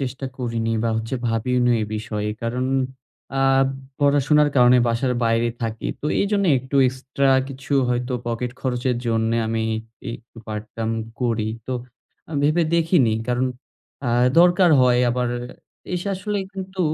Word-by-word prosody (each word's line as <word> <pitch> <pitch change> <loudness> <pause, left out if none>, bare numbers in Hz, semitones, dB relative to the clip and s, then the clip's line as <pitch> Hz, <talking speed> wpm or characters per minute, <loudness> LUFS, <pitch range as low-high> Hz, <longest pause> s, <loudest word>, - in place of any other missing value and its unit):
চেষ্টা 135 0 -4
করিনি 115 -3 -2
বা - - +2
হচ্ছে 115 +3 -3
ভাবিওনি 120 +2 +1
এই 105 - -1
বিষয়ে। 105 -1 -3
কারণ 120 +2 -1 0.7
আ - - -2 0.6
পড়াশোনার 145 +1 +4
কারণে 125 0 +6
বাসার 120 +2 +1
বাইরে 115 +1 +2
থাকি। 115 -1 -3
তো - - -3
এইজন্য 200 0 +1
একটু 130 +2 -4
এক্সট্রা 130 +2 -1 0.2
কিছু 135 +1 -7 0.2
হয়তো 125 +1 -1
পকেট 120 +1 -2
খরচের 125 -1 -1
জন্যে 115 0 +1
আমি 115 0 -1 0.5
ই - - -2
একটু 115 0 -19
পার্ট-টাইম 110 +1 -4 0.3
করি। 115 -3 0 0.2
তো 130 - -3 0.6
আ - - -14
ভেবে 155 +4 +3
দেখিনি। 165 -8 +3 0.2
কারণ 125 +1 +1 0.6
আ - - -2 0.3
দরকার 175 +1 +5
হয় 125 -1 +4
আবার 125 0 0 0.6
এসে 180 +2 -2
আসলে 205 +2 -3
কিন্তু 190 -1 -6
125 Hz, 140 wpm, -22 LUFS, 115-145 Hz, 0.7 s, কারণে